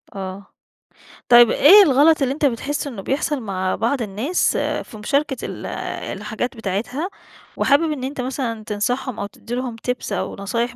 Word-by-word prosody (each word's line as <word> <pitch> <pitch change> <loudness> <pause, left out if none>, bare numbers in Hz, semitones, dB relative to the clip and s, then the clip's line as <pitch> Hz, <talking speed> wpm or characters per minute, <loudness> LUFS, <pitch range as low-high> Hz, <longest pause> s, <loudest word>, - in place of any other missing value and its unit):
آه. 190 0 -6 0.8
طيب، 240 -1 +8
إيه 395 +8 +8
الغلط 305 0 +4
اللي 265 -1 +1
أنت 295 +1 -1
بتحس 285 +3 -1
إنه 230 -8 -6
بيحصل 280 +5 -1
مع 190 -3 -2
بعض 240 +4 0
الناس 225 - 0
في 220 - -3
مشاركة 275 +5 0
ال - - -7 0.5
الحاجات 220 +5 -4
بتاعتها 225 - -3 0.5
وحابب 310 +3 +3
إن 280 -4 -4
أنت 265 0 -3
مثلًا 250 -4 -3
تنصحهم 245 +4 -2
أو 200 - -2
تدّي 225 +4 -7
لهم 250 -2 -3
tips 250 -3 -2
أو 200 - -2
نصايح 230 +5 -2
245 Hz, 155 wpm, -21 LUFS, 210-280 Hz, 0.8 s, طيب